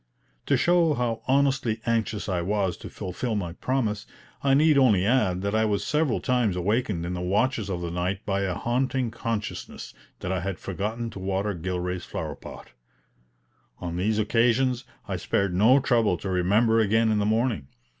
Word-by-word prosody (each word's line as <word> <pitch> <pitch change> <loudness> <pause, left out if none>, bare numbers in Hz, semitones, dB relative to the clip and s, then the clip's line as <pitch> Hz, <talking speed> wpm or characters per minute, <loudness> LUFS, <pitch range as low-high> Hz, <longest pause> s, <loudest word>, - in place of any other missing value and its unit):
To - - +3
show 170 -3 +3
how 115 -3 -1
honestly 135 -4 +2
anxious 115 -2 -1
I 90 -3 0
was 95 0 0
to - - -9
fulfil 110 +6 -4
my 90 -5 -3
promise, 110 -2 -2 0.3
I 135 -1 +3
need 155 +1 +5
only 110 -9 +4
add 100 -6 +2
that 100 +1 -1
I 110 0 +3
was 105 -2 0
several 150 -4 +1
times 125 -7 +1
awakened 100 -1 0
in 90 - -3
the 90 - -4
watches 105 +4 0
of 90 -2 -3
the 85 -1 -3
night 90 +3 -2
by 100 -1 0
a 95 -3 -1
haunting 125 +2 -1
consciousness 110 -2 -5 0.3
that - - -3
I 95 - 0
had 95 +1 -3
forgotten 110 +5 -4
to 100 - -8
water 95 +2 -1
Gilray's 90 +1 -3
flower - - -5
pot. - - -11 1.1
On 85 -2 -5
these 105 +4 0
occasions 120 +3 +2 0.2
I - - -2
spared 100 -2 0
no 110 +9 +5
trouble 115 -8 +2
to 95 - -5
remember 105 +6 +3
again 110 +1 +3
in 105 - +2
the 100 - +1
morning. 110 - 0
105 Hz, 175 wpm, -26 LUFS, 95-120 Hz, 1.1 s, need